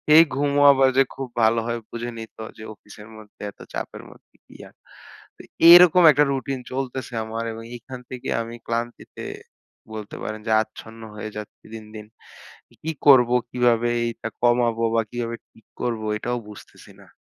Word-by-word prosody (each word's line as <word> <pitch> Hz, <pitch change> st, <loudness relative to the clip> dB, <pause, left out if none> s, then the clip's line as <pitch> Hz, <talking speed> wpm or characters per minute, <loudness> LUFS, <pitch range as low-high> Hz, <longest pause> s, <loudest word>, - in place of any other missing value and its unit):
এই 165 Hz, -, +10 dB
ঘুমও 145 Hz, 0 st, +2 dB
আবার 135 Hz, 0 st, +4 dB
যে 135 Hz, -, +7 dB
খুব 135 Hz, -1 st, -5 dB, 0.2 s
ভালো 115 Hz, +1 st, +4 dB
হয় 120 Hz, 0 st, -2 dB
বুঝেনই 115 Hz, -1 st, -6 dB
তো, 110 Hz, -, -7 dB
যে 110 Hz, -, -10 dB
অফিসের 105 Hz, +1 st, -14 dB
মধ্যে, 105 Hz, -1 st, -16 dB
এত -, -, -38 dB
চাপের -, -, -6 dB
মধ্যে -, -, -22 dB
কি -, -, -18 dB
আর। -, -, -27 dB, 0.6 s
তো -, -, -11 dB, 0.3 s
এরকম 175 Hz, 0 st, +8 dB
একটা 150 Hz, +1 st, +4 dB
রুটিন 135 Hz, 0 st, -3 dB
চলতেছে 130 Hz, -1 st, -4 dB
আমার 115 Hz, +1 st, -4 dB
এবং 115 Hz, -, -9 dB
এইখান 130 Hz, +1 st, -9 dB
থেকে 125 Hz, -1 st, -7 dB
আমি 115 Hz, +1 st, -7 dB
ক্লান্তিতে 115 Hz, +1 st, -5 dB, 0.7 s
বলতে 105 Hz, -1 st, -7 dB
পারেন 110 Hz, 0 st, -5 dB
যে 110 Hz, -, 0 dB
আচ্ছন্ন 110 Hz, +1 st, -13 dB
হয়ে 110 Hz, +1 st, -6 dB
যাচ্ছি 105 Hz, -, -10 dB
দিন, 110 Hz, -1 st, -9 dB
দিন। 105 Hz, 0 st, -9 dB, 0.7 s
ই -, -, -22 dB
কি 160 Hz, -, -2 dB, 0.2 s
করব? 125 Hz, -4 st, +7 dB, 0.2 s
কিভাবে 120 Hz, -1 st, +2 dB, 0.2 s
এইটা 115 Hz, -1 st, -4 dB
কমাবো 120 Hz, -1 st, +2 dB
বা 115 Hz, -, +3 dB
কিভাবে 115 Hz, -1 st, -4 dB
ঠিক 115 Hz, -, -23 dB, 0.2 s
করব? 115 Hz, -3 st, -2 dB
এইটাও 120 Hz, +3 st, -3 dB
বুঝতেছি 105 Hz, -1 st, -14 dB
না। -, -, -18 dB
120 Hz, 170 wpm, -23 LUFS, 110-130 Hz, 0.7 s, এই